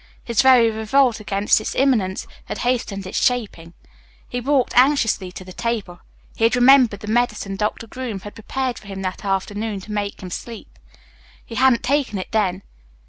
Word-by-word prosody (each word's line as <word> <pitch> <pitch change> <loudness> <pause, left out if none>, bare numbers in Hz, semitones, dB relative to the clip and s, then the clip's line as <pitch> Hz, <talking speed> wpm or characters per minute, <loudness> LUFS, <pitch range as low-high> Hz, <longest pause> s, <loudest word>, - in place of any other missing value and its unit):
His 235 -3 +2
very 250 -4 +6
revolt 220 +2 +2
against 205 0 +1
its - - -4
imminence 220 -9 +1 0.2
had - - -5
hastened 225 -6 -1
its 185 - -2
shaping. 210 -9 -1 0.5
He 245 - -4
walked 270 0 +1
anxiously 245 -8 +3
to 185 - -9
the 185 - -10
table. 210 -6 -3 0.4
He - - -3
had 230 +2 +4
remembered 245 -4 +5
the 210 - -8
medicine 215 -3 0
Doctor 210 +3 -2
Groom 230 -4 -6
had 205 - -9
prepared 255 +3 -3
for 205 - -16
him 195 -1 -6
that 185 -1 -4
afternoon 205 +2 -2
to 210 - -10
make 205 -1 -3
him 180 - -7
sleep. 230 +5 -8 0.7
He - - -10
hadn't 255 0 +3
taken 270 -5 0
it 185 - -6
then. 200 -4 0
220 Hz, 175 wpm, -21 LUFS, 195-245 Hz, 0.7 s, very